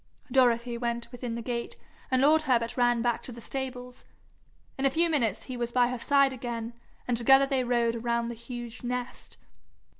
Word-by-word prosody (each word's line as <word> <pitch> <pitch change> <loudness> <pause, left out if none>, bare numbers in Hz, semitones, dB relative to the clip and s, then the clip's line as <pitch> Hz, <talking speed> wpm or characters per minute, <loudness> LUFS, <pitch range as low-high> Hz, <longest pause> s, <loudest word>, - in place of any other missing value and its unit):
Dorothy 240 -2 +2
went 235 0 -3
within 245 -2 -5
the 235 - -5
gate, 235 -1 -4 0.3
and 260 -1 +2
lord 310 +2 +5
Herbert 240 -5 +1
ran 240 -2 +2
back 240 -2 0
to - - -7
the 235 - -9
stables. 250 0 -5 0.7
In 270 - -4
a 275 - +5
few 330 +4 +1
minutes 225 -8 0
he 255 - -6
was 240 -1 -3
by 245 0 +3
her 250 -1 -4
side 275 +1 +3
again, 235 -2 -5 0.3
and 245 - +1
together 270 +4 +6
they 270 -2 0
rode 235 -1 +1
around 235 0 -1
the - - -4
huge 240 0 -8
nest. 245 0 -5
245 Hz, 185 wpm, -28 LUFS, 235-260 Hz, 0.7 s, together